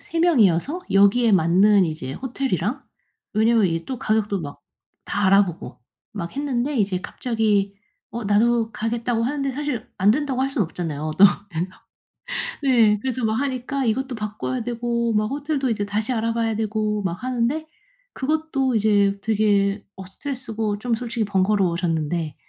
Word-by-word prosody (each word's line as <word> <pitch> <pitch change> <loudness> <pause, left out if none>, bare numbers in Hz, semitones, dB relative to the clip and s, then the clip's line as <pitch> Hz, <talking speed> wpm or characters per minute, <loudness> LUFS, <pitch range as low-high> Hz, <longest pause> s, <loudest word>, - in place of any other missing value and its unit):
3 330 0 -3
명이어서 280 - +3
여기에 200 +3 +4
맞는 190 +3 +5
이제 155 -5 -4
호텔이랑 255 - -2 0.5
왜냐하면 220 -1 +4
이게 165 -1 -2
또 260 -3 -5
가격도 210 -3 0
막 145 -2 -7 0.5
다 200 - 0
알아보고 195 -3 +2 0.3
막 180 +3 -6
했는데 280 -1 -1
이제 195 -4 0
갑자기 210 -2 0 0.4
"어 235 - -4
나도 225 +2 +2
가겠다."고 230 +1 -1
하는데 275 +1 -1
사실 275 -4 -3
안 200 +3 +5
된다고 270 -2 -1
할 270 - +1
수는 255 -8 0
없잖아요 155 -3 -4
또. 200 - +9 0.3
그래서 175 +2 -3 0.9
네. 230 -6 +4
그래서 255 -2 -2
뭐 220 - +1
하니까 265 +1 -2
이것도 255 +3 -1
바꿔야 215 +4 -4
되고 235 0 -1
막 215 0 +2
호텔도 280 +2 -2
이제 210 -3 -1
다시 215 +5 -1
알아봐야 230 -1 0
되고 215 -1 -1
막 180 +1 -3
하는데 255 +5 -1 0.5
그것도 275 -3 0
이제 205 -2 +2
되게 205 -2 +1
어 190 - -8
스트레스고 225 -3 -4
좀 235 0 0
솔직히 235 -1 -3
번거로워졌는데. 175 -6 0
220 Hz, 335 characters per minute, -23 LUFS, 200-250 Hz, 0.9 s, 또